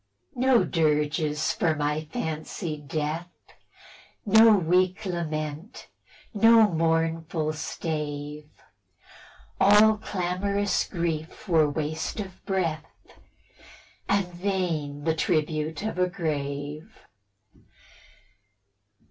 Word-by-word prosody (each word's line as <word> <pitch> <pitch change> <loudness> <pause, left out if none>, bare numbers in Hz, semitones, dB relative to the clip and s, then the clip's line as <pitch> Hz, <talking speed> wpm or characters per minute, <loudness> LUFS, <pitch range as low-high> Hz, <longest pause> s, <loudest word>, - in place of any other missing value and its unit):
No 255 -2 +3
dirges 150 -1 0
for 170 -8 +1
my 150 +1 -1
fancied 155 -4 -5
death; 155 +4 -3 1.0
No 220 +1 +7
weak 185 +3 +1
lament, 160 - -4 0.4
no 225 +1 +6
mournful 165 -2 0
stave; 150 -2 -5 1.1
All 210 +2 +6
clamorous 200 +1 -1
grief 165 0 -4
were 160 -4 +4
waste 155 +6 -3
of 190 -3 -7
breath, 165 -5 -3 1.0
And 200 -1 +2
vain 175 -6 -2
the 160 0 +1
tribute 155 0 -1
of 215 -4 -3
o 180 0 +2
grave. 150 +1 -4
165 Hz, 80 wpm, -26 LUFS, 155-190 Hz, 1.1 s, No